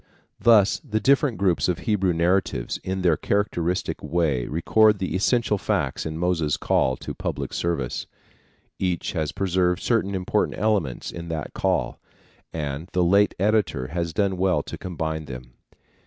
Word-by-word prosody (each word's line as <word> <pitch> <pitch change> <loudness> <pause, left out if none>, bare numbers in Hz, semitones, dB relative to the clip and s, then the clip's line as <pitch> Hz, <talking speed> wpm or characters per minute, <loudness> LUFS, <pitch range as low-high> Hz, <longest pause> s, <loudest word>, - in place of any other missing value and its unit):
Thus 105 -4 +5
the 110 0 -2
different 135 +1 +3
groups 95 -2 +1
of 90 - 0
Hebrew 100 -5 +1
narratives 85 -7 0
in 95 0 -3
their 85 -3 +4
characteristic 90 -2 -1
way 75 -8 0
record 105 +7 +3
the 95 -1 -3
essential 105 +1 +1
facts 80 -11 -1
in 80 0 -5
Moses' 85 -4 0
call 65 -1 +1
to - - -6
public - - -4
service. 85 -7 -2 0.7
Each 90 -3 -1
has 80 -4 -2
preserved 90 -2 +1
certain 105 -5 0
important 90 -1 0
elements 100 - 0
in 85 0 -7
that 80 -2 -4
call, - - -1 0.5
and 75 +2 -4
the 90 - +2
late 100 +4 +3
editor 100 -10 +1
has 85 +1 -2
done 95 +3 0
well 95 0 +1
to - - -7
combine 80 -3 -4
them. 60 -2 -9
90 Hz, 150 wpm, -24 LUFS, 80-100 Hz, 0.7 s, Thus